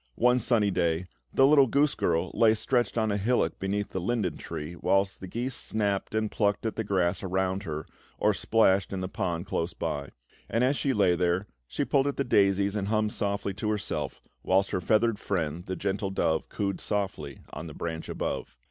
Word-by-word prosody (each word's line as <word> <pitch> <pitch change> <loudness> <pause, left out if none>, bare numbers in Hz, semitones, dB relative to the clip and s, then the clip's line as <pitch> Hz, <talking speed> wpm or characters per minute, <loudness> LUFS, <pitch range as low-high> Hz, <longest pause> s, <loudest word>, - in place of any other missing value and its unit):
One 125 +1 +4
sunny 110 -5 +3
day, 85 -1 0 0.3
the 135 - +5
little 140 -1 +6
goose 140 +4 +3
girl 85 +2 0
lay 110 -1 +5
stretched 120 +2 0
on 110 -2 +2
a 100 - +1
hillock 120 +5 +1
beneath 100 +1 -1
the 95 - -3
linden 95 -5 -1
tree, 75 +3 -6
whilst 95 +2 +1
the 95 - -6
geese 120 +7 -3
snapped 100 -2 -1
and 110 -1 0
plucked 105 +1 0
at 110 - -1
the 110 - -1
grass 95 -3 +1
around 95 0 -1
her, 75 -2 -4 0.3
or - - +3
splashed 100 -4 +2
in 95 -1 -3
the 95 - -2
pond 90 -4 -2
close 85 -1 -2
by; 70 -1 -3 0.4
and 115 +3 +1
as 130 +3 +3
she 140 - 0
lay 95 -5 +3
there, 90 +2 +1 0.2
she - - -2
pulled 140 0 +2
at 140 - -2
the 140 - +1
daisies 100 -4 +3
and 100 -2 -1
hummed 110 0 +1
softly 100 -1 -1
to 105 +2 -3
herself, 105 -1 -3 0.2
whilst 95 +1 +2
her 90 - -1
feathered 110 +3 +2
friend, 85 -3 -2
the 95 - -2
gentle 100 +1 -2
dove, 80 -4 0
cooed 100 -3 -2
softly 100 -2 -3
on 80 - -6
a - - -9
branch 80 -1 -5
above. - - -4
100 Hz, 200 wpm, -28 LUFS, 90-110 Hz, 0.4 s, little